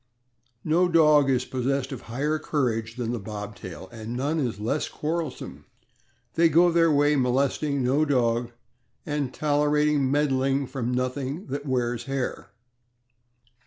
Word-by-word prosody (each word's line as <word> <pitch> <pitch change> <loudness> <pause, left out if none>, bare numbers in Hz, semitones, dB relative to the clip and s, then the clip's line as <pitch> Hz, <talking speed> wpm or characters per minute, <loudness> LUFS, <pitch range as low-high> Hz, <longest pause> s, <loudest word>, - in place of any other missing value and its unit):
No 170 +4 +3
dog 150 -4 +5
is 130 -1 +1
possessed 135 +1 -2
of 130 - -6
higher 145 +7 -2
courage 115 -8 -1
than 120 -2 -3
the 120 - -2
Bobtail, 105 -4 -8
and 115 +1 -6
none 145 +5 0
is 120 -8 -2
less 115 +8 -1
quarrelsome. 160 -2 -4 0.7
They 165 0 +4
go 170 +3 +5
their 165 -1 +4
way, 145 0 +3
molest 130 +1 +1
ing 140 -3 0
no 135 +5 +2
dog 120 -5 +1 0.6
and 145 -4 -2
tolerating 150 -1 +1
meddling 135 -1 +1
from 125 -2 -3
nothing 130 +6 -2
that 145 +1 -4
wears 120 -2 -1
hair. 135 -2 -3
135 Hz, 135 wpm, -25 LUFS, 125-150 Hz, 0.7 s, dog